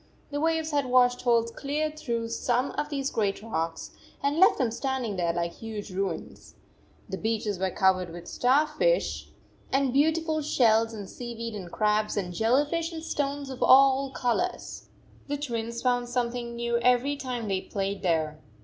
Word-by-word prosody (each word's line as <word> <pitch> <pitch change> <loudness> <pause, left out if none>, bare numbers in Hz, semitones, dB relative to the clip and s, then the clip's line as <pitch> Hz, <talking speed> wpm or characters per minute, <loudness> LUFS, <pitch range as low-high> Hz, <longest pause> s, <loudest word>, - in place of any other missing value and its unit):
The 290 0 -2
waves 320 0 +1
had 285 -3 +1
washed 245 0 +4
holes 230 -2 +2
clear 295 +4 -2
through 235 -7 -3
some 245 +3 0
of 295 0 -3
these 275 -2 -2
great 205 -2 -1
rocks 165 -7 -3 0.3
and 285 +3 +1
left 380 - +6
them 245 -4 +1
standing 255 -3 -2
there 175 -2 +1
like 170 0 -2
huge 215 -3 -7
ruins. 190 -1 -4 0.5
The 190 -1 -5
beaches 215 -3 -1
were 190 0 +1
covered 185 -1 +2
with 175 +1 -9
star 265 +5 +3
fish - - 0 0.5
"5 270 - +3
and 270 -3 0
beautiful 315 +2 +2
shells 230 -5 +3
and 205 -3 -7
seaweed 230 0 -6
and 185 -5 -7
crabs 210 0 +1
and 180 -3 -2
jelly 235 +9 +3
fish 330 +3 -2
and 320 -1 -7
stones 285 -2 -2
of 260 - -8
all 270 +1 +6
colors. 270 +8 -2 0.4
The 290 0 -2
Twins 235 -4 -4
found 245 -1 +1
something 240 -1 -2
new 235 0 0
every 250 +4 +3
time 250 -5 -4
they 190 -2 0
played 195 0 -3
there. 155 -3 0
240 Hz, 170 wpm, -27 LUFS, 210-280 Hz, 0.5 s, left